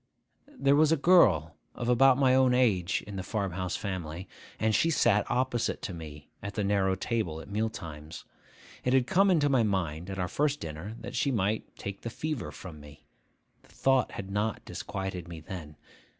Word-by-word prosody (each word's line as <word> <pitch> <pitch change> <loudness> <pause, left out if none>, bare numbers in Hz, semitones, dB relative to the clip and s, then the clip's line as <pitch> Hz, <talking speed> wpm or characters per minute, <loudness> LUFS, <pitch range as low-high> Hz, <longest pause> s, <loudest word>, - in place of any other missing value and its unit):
There 140 - +4
was 155 +1 +4
a 165 - +4
girl 95 - +4 0.2
of 120 - -4
about 130 +1 +5
my 130 -2 +4
own 130 -1 +4
age 100 -8 +2
in 100 -1 -7
the - - -2
farm 100 0 -2
house 90 +1 -3
family, 90 -2 -5 0.3
and 110 0 +2
she 165 - +3
sat 115 -9 +3
opposite 125 -1 0
to 95 - -4
me 75 -3 -10
at 100 0 -6
the 105 - 0
narrow 100 -1 +2
table 95 -6 -2
at 80 - -11
meal 110 +2 0
times. 80 -6 -9 0.6
It 125 - +1
had 130 -2 +4
come 195 +10 +3
into 160 -6 +3
my 135 -4 +3
mind, 90 -5 -1
at 95 - -5
our 90 -1 -1
first 145 +7 0
dinner, 80 +8 -6
that 120 +3 -7
she 140 - +1
might 110 -3 -1
take 100 0 -6
the 115 - -4
fever 150 +2 -4
from 85 -5 -10
me. 75 +1 -14 0.6
The - - -24
thought 135 -2 +1
had 95 0 -6
not 105 +2 -1
disquieted 95 -4 -5
me 85 -2 -8
then. 80 -2 -8
100 Hz, 195 wpm, -29 LUFS, 90-125 Hz, 0.6 s, about